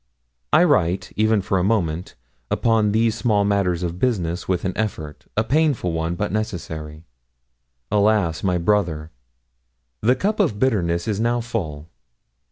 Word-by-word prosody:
I 155 +3 +6
write, 95 - +1
even 110 -2 +2
for 95 -1 0
a - - +1
moment, 90 -5 -1 0.3
upon 110 -2 +2
these 110 +1 +2
small 110 -3 +1
matters 95 -4 +1
of 85 +1 -3
business 90 -9 -1
with 90 -1 -1
an 95 - -2
effort 80 -9 -4
a 110 - +3
painful 140 - +1
one, 80 +1 -2
but 105 +4 -2
necessary. 80 -7 -4 0.9
Alas! 100 -5 +2
my 90 -2 +1
brother! 85 -4 0 0.9
The 125 +3 +3
cup 210 +7 -1
of 165 - +2
bitterness 90 -9 0
is 105 -2 -1
now 120 +2 +1
full. 85 -11 -4
100 Hz, 145 wpm, -22 LUFS, 85-110 Hz, 0.9 s, I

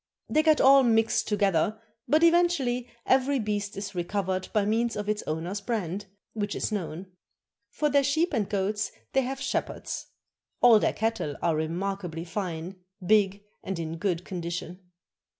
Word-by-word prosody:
They 310 - +3
get 310 -1 +4
all 275 +1 +7
mixed 225 -3 +2
together, 205 0 +1 0.3
but 305 +6 +3
eventually 330 -8 +3 0.2
every 270 +2 +3
beast 205 -3 -2
is 200 0 -5
recovered 185 +1 -2
by 210 -2 +2
means 230 +2 +1
of 210 0 -4
its 210 0 0
owner's 170 +6 -3
brand, 200 -3 -3 0.3
which 205 -2 -3
is - - -2
known. 180 -3 -4 0.6
For 300 - 0
their 285 -1 +3
sheep 315 +6 +1
and 210 -3 0
goats 210 +1 -1 0.2
they 270 - +4
have 265 +1 -4
shepherds. 275 - -3 0.5
All 235 -3 +7
their - - +1
cattle 220 -10 -1
are 165 -2 +2
remarkably 170 +1 -3
fine, 180 0 -4 0.3
big, 200 0 +3 0.2
and 190 -1 -3
in 165 0 -4
good 180 -2 -1
condition. 175 0 -5
205 Hz, 150 wpm, -27 LUFS, 180-245 Hz, 0.6 s, all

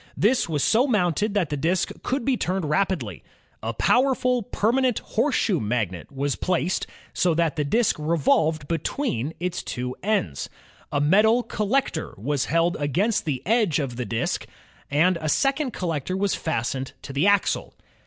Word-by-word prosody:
This 225 -1 +2
was 150 -3 0
so 245 +5 +4
mounted 205 - +1
that 180 -7 +1
the - - 0
disk 170 +5 0
could 260 -2 -2
be 270 - +2
turned 185 -5 -1
rapidly. 150 - -1 0.4
A 115 - -2
powerful 250 - +2
permanent 240 +4 +1
horseshoe 225 - 0
magnet 105 -6 -2
was 140 0 -1
placed 180 0 -1 0.3
so 175 -3 +2
that 165 -2 +1
the 150 - 0
disk 220 +10 +2
revolved 155 -1 +1
between 160 - -2
its 180 0 -2
two 125 +1 -4
ends. 190 - -1 0.4
A 145 - +1
metal 210 +11 +4
col 210 -2 -3
lector 265 -10 0
was 140 +6 -1
held 165 +2 +2
against 175 - +1
the 140 -5 -2
edge 215 -7 +2
of 135 -6 -2
the 125 0 -3
disk, 115 +2 -2 0.4
and 170 +5 +3
a 155 - -1
second 275 - +1
collector 175 -1 -2
was 200 0 +1
fastened 130 -2 -2
to 135 - -7
the 145 +8 +2
axle. 200 -1 +1
170 Hz, 160 wpm, -24 LUFS, 145-215 Hz, 0.4 s, so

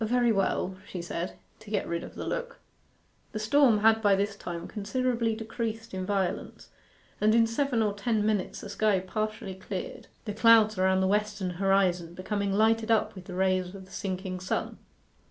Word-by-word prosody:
'Very 240 +1 +3
well,' 195 -2 0
she 180 - -6
said, 170 +1 -4 0.2
to 220 - -13
get 205 -2 -1
rid 170 0 -2
of - - -10
the - - -5
look. - - -4 0.8
The 215 - -3
storm 230 -1 +4
had 225 +1 +5
by 205 -2 +5
this 200 +1 -1
time 175 -4 -6
considerably 230 +1 -1
decreased 225 0 -5
in 185 0 -3
violence, 195 -3 -2 0.5
and 215 +1 +4
in 230 -1 +6
seven 230 0 0
or 210 -1 0
ten 210 +1 0
minutes 210 -3 -1
the 205 - -8
sky 205 -1 +2
partially 215 +1 -3
cleared, 190 0 -6 0.2
the 210 - -3
clouds 220 -2 +5
around 190 0 +3
the 190 - +2
western 205 -2 0
horizon 180 -2 +1
becoming 200 +2 -2
lighted 220 +2 +2
up 225 -2 +2
with 185 -2 -11
the 180 - -7
rays 185 0 +1
of 190 -1 -10
the 190 - -19
sinking 185 -1 -4
sun. 185 - -3
205 Hz, 180 wpm, -28 LUFS, 190-225 Hz, 0.8 s, in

